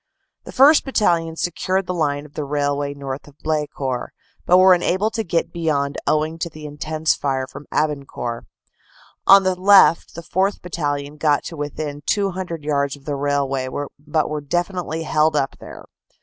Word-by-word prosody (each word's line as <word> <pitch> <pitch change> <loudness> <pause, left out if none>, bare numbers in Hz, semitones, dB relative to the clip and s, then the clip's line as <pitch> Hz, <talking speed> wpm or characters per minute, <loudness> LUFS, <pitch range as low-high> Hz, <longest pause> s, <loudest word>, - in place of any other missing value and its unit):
The - - -8
1st. 290 +4 +6
Battalion 170 - +1
secured 185 +3 -1
the 180 - -3
line 145 -4 -1
of 150 - -16
the 150 - -4
railway 145 0 -1
north 140 0 -6
of 145 0 -17
Blecourt, 145 -5 -2 0.4
but 180 - +6
were 185 0 +7
unable 185 +4 +1
to 225 0 -2
get 170 -3 -1
beyond 145 -4 -1
owing 155 +2 0
to 170 - -2
the 155 -1 -11
intense 155 +1 -1
fire 135 -2 -2
from 140 - -12
Abancourt. 140 -6 -2 0.8
On 195 0 +8
the 185 0 +2
left 190 -2 +5
the 170 - -7
4th. 190 +4 -1
Battalion 145 -4 -3
got 150 -1 +2
to 165 - -7
within 145 0 -5
200 185 -5 -1
yards 140 -1 0
of 140 -1 -19
the 145 - -2
railway, 140 -2 -1 0.3
but 150 +1 -1
were 150 -1 -3
definitely 175 +1 -2
held 155 0 +2
up 135 -2 -1
there. - - -11
155 Hz, 165 wpm, -21 LUFS, 145-175 Hz, 0.8 s, On